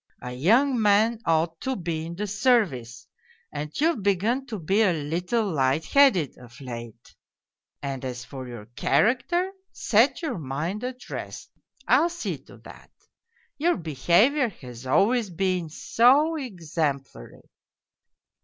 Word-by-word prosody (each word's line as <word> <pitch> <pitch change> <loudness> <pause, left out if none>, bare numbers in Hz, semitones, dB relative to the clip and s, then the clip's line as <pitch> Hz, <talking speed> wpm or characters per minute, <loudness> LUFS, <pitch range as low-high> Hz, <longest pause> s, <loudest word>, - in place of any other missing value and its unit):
A 125 - -5
young 230 - +3
man 215 +2 +3
ought 165 0 +1
to 265 0 -2
be 165 -4 -4
in 170 - -7
the 205 +4 -3
service, 200 - 0 0.5
and 150 +1 -4
you've 315 -6 +2
begun 210 +7 0
to 220 - -5
be 195 +5 +1
a 195 -5 +4
little 175 +9 -1
light 135 +2 +1
headed 240 - +3
of 120 -1 -14
late. 120 -3 -9 0.7
And 135 -2 -4
as 125 -1 -5
for 130 -2 -8
your 120 -4 -9
character, 345 - +1 0.2
set - - +2
your 250 - -2
mind 160 - -4
at 255 0 -6
rest: - - -7 0.4
I'll 290 +8 +4
see 345 0 -4
to - - -15
that! - - -14 0.7
Your 345 +4 +2
behaviour 180 - +2
has 125 - -11
always 220 - +2
been 180 -1 -1
so 250 - +3
exemplary 160 - -4
185 Hz, 135 wpm, -25 LUFS, -, 0.7 s, a